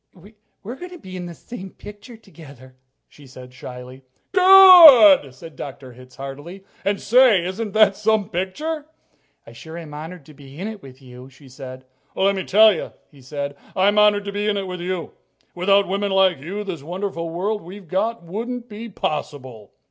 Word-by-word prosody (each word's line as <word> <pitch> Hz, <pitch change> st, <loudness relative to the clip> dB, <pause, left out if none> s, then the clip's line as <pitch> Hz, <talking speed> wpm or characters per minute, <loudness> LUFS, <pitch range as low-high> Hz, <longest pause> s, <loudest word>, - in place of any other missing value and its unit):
"We're 235 Hz, +6 st, -8 dB
going 360 Hz, +4 st, -9 dB
to 360 Hz, -, -11 dB
be 185 Hz, -, -12 dB
in 180 Hz, -1 st, -7 dB
the 170 Hz, -, -10 dB
same 195 Hz, -2 st, -10 dB
picture 210 Hz, +5 st, -13 dB
together," 145 Hz, -, -16 dB, 0.3 s
she 145 Hz, -2 st, -18 dB
said 125 Hz, 0 st, -14 dB
shyly. 125 Hz, +1 st, -11 dB, 0.3 s
"Good!" 350 Hz, -, +8 dB
said 165 Hz, +3 st, -13 dB
Dr. 130 Hz, -2 st, -10 dB
Hitz 125 Hz, +1 st, -17 dB
heartily. 145 Hz, +8 st, -10 dB, 0.2 s
"And, 200 Hz, 0 st, -1 dB
say, 235 Hz, -7 st, +3 dB
isn't 200 Hz, +3 st, -5 dB
that 215 Hz, -2 st, +4 dB
some 215 Hz, 0 st, 0 dB
picture?" 290 Hz, -, -5 dB, 0.6 s
"I -, -, -14 dB
sure 160 Hz, +1 st, -11 dB
am 160 Hz, -3 st, -10 dB
honored 160 Hz, +1 st, -9 dB
to 155 Hz, -, -16 dB
be 140 Hz, -1 st, -15 dB
in 190 Hz, +5 st, -5 dB
it 220 Hz, -2 st, -8 dB
with 135 Hz, -1 st, -15 dB
you," 125 Hz, 0 st, -13 dB
she 135 Hz, +1 st, -19 dB
said. 130 Hz, 0 st, -11 dB, 0.3 s
"Let 195 Hz, +1 st, +1 dB
me 190 Hz, -, -5 dB
tell 215 Hz, +2 st, +5 dB
you," 165 Hz, -, -7 dB, 0.2 s
he 140 Hz, -3 st, -19 dB
said, 140 Hz, +2 st, -6 dB, 0.2 s
"I'm 200 Hz, +2 st, +2 dB
honored 205 Hz, -1 st, +3 dB
to 200 Hz, -, -5 dB
be 205 Hz, +1 st, -3 dB
in 210 Hz, -1 st, 0 dB
it 195 Hz, -, -4 dB
with 180 Hz, -1 st, -7 dB
you. 180 Hz, -1 st, -5 dB, 0.4 s
Without 195 Hz, +3 st, +2 dB
women 200 Hz, +2 st, -2 dB
like 190 Hz, -4 st, +2 dB
you, 190 Hz, +9 st, -6 dB
this 185 Hz, -7 st, -7 dB
wonderful 175 Hz, +1 st, -5 dB
world 200 Hz, +6 st, -3 dB
we've 185 Hz, +2 st, -12 dB
got 205 Hz, +4 st, -2 dB
wouldn't 235 Hz, +7 st, -6 dB
be 225 Hz, +1 st, -9 dB
possible." 130 Hz, -, -6 dB
185 Hz, 185 wpm, -20 LUFS, 145-210 Hz, 0.6 s, Good